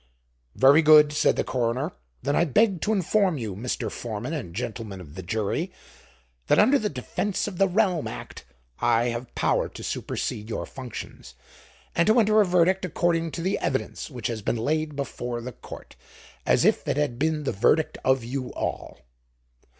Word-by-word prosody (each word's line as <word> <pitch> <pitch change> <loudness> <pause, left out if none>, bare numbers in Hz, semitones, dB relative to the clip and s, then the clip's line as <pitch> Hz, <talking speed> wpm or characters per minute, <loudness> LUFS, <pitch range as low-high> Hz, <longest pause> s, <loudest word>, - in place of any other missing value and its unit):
"Very 140 +4 +6
good," 150 -1 +7
said 150 - +3
the - - 0
coroner. 130 +4 -1 0.3
"Then 145 +2 0
I - - +4
beg 185 - +2
to 215 - 0
inform 195 -3 +2
you, 110 -7 -4
Mr. 115 0 -3
Foreman 120 +5 -5
and 115 - -5
gentlemen 110 -4 -5
of 75 -5 -11
the 95 - -7
jury, 100 +3 -2 0.8
that - - +4
under 260 +7 +5
the 210 - -1
Defense 180 +11 -2
of 185 -4 -6
the 195 - +5
Realm 185 -4 +1
Act, - - -8 0.4
I 120 +2 +2
have 120 +1 -6
power - - +1
to - - -10
supersede 105 +1 -4
your - - -3
functions, 125 - -9 0.6
and 170 - +3
to 220 +3 +5
enter 215 -1 +5
a - - +4
verdict 180 +2 +3
according 165 -1 0
to 170 - -4
the 190 +2 0
evidence 130 +4 -2
which 125 -5 -9
has 115 -2 -2
been 115 - -1
laid 155 +5 -1
before 125 -3 -4
the 125 +2 -6
Court - - -12 0.5
as - - +4
if - - +2
it - - 0
had 145 -5 -1
been 155 0 0
the - - -1
verdict 150 +10 +2
of 130 -2 +2
you 125 +1 -4
all." - - -4
140 Hz, 180 wpm, -25 LUFS, 120-175 Hz, 0.8 s, good